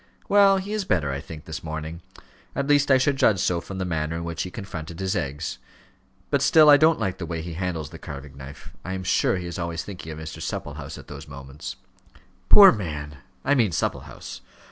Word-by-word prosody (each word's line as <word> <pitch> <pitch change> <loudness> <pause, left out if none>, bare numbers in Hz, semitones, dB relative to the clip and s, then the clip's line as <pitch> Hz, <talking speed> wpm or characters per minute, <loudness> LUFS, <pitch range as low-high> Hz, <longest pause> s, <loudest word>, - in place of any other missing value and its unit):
"Well, 200 -1 +6
he 195 +2 -4
is 215 -2 -1
better, 80 - 0
I 70 - -3
think, 80 0 -10
this 80 - -6
morning; 80 +1 -5 0.5
at 140 - 0
least 145 0 +3
I 135 - +7
should 135 +1 +1
judge 105 -7 +4
so 90 -2 +1
from 95 - -8
the 95 - -2
manner 80 -2 -2
in 85 - -4
which 85 -1 -4
he 90 - -3
confronted 85 -5 -7
his 95 -1 -1
eggs. 75 +2 -3 0.7
But 140 -2 +2
still 150 +2 +7
I 145 - +9
don't 160 +2 +4
like 95 -2 -2
the 85 - -3
way 80 -1 -4
he 85 0 -6
handles 85 -3 -3
the - - -10
carving 70 0 -9
knife. 70 0 -11
I 95 - -4
am 95 0 -4
sure 95 +1 +2
he 90 - -5
is 85 +1 -5
always 85 -1 -3
thinking 90 -5 -8
of 75 - -7
Mr. 80 0 -7
Supplehouse - - -5
at - - -11
those 70 +1 -9
moments." 70 0 -8 0.7
"Poor 200 -2 +10
man! 75 -7 -5 0.3
I 140 - +4
mean 120 -7 +3
Supplehouse. 75 - -4
85 Hz, 215 wpm, -25 LUFS, 80-125 Hz, 0.7 s, Poor